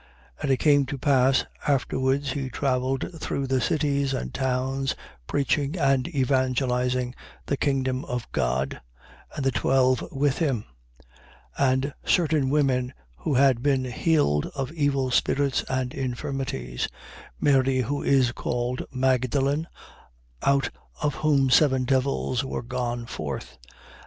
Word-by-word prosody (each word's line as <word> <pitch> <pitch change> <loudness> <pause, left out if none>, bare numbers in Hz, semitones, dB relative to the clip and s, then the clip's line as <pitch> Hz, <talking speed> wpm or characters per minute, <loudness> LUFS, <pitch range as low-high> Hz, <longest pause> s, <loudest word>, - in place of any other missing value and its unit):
And - - -1
it 135 - +3
came 145 -2 +4
to 140 - -4
pass 135 -1 +3 0.2
afterwards 135 0 +1
he 135 -1 -3
travelled 135 +5 -1
through 140 - -2
the 130 -1 +1
cities 140 -2 +1
and 65 - -4
towns, 130 +1 -1 0.3
preaching 145 +3 0
and 135 -4 +2
evangelizing 130 -3 0 0.3
the 140 - 0
kingdom 130 -1 0
of 125 -1 -3
God: 65 +2 -1 0.5
and 140 -3 -3
the 135 - +3
twelve 130 0 +2
with 140 -1 0
him: 135 -10 0 0.9
8:2. 135 -2 +4
And 135 +2 -1
certain 155 -6 +2
women 130 -3 +1 0.2
who 145 - -1
had 130 -2 +4
been 135 -2 +1
healed 125 - +1
of 135 -1 -3
evil 140 -5 0
spirits 140 +2 +1
and 130 -1 -1
infirmities: 125 - -3 0.5
Mary 135 -2 +3
who 140 +4 -2
is 130 -3 +3
called 120 +1 -2
Magdalen, 130 +4 +1 0.7
out 140 -1 +2 0.3
of 150 -2 0
whom 140 -4 +3
seven 130 -1 +4
devils 130 -1 0
were 135 - -4
gone 120 -1 -3
forth, 115 - -6
8:3. - - -20
135 Hz, 130 wpm, -25 LUFS, 125-140 Hz, 0.9 s, came